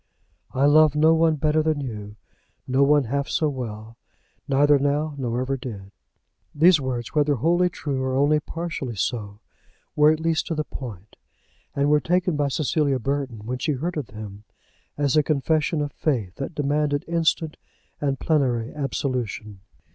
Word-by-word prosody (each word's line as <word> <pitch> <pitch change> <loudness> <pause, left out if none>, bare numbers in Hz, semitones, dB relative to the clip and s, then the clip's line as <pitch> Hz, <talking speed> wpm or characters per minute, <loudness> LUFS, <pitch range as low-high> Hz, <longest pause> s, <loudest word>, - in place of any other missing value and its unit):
"I 135 +2 +2
love 150 0 +5
no 155 +2 +5
one 165 -1 +3
better 155 +1 +1
than 155 -1 0
you; 105 -6 -6 0.5
no 130 +2 +2
one 145 +1 +5
half 140 +4 -2
so 155 - +1
well, 115 -4 -7 0.5
neither 145 +1 +4
now, 145 +2 0
nor 125 -3 -2
ever 135 +1 -1
did." 105 -7 -8 0.6
These 160 +1 +5
words, 125 -3 -4
whether 150 -1 +2
wholly 175 +8 +2
true 140 -6 -3
or 130 0 -1
only 145 +3 +3
partially 160 -6 -5
so, 105 -1 -3 0.5
were 150 0 +6
at 155 - 0
least 160 0 0
to 165 - -2
the 155 - -1
point; 110 - -9 0.6
and 140 0 +2
were 150 - +5
taken 180 +2 +1
by 145 -1 +1
Cecilia 140 0 +1
Burton, 130 -4 -3
when 125 +2 -3
she 150 - 0
heard 165 +7 -3
of 145 -6 -3
them, 105 -1 -9 0.5
as 145 -1 +1
a 155 - +6
confession 155 +1 0
of 145 - -4
faith 115 - -1
that 140 +4 -5
demanded 145 0 0
instant 165 -1 0 0.4
and 140 -2 -1
plenary 130 -7 0
absolution. 125 -8 -3
140 Hz, 160 wpm, -24 LUFS, 125-155 Hz, 0.6 s, were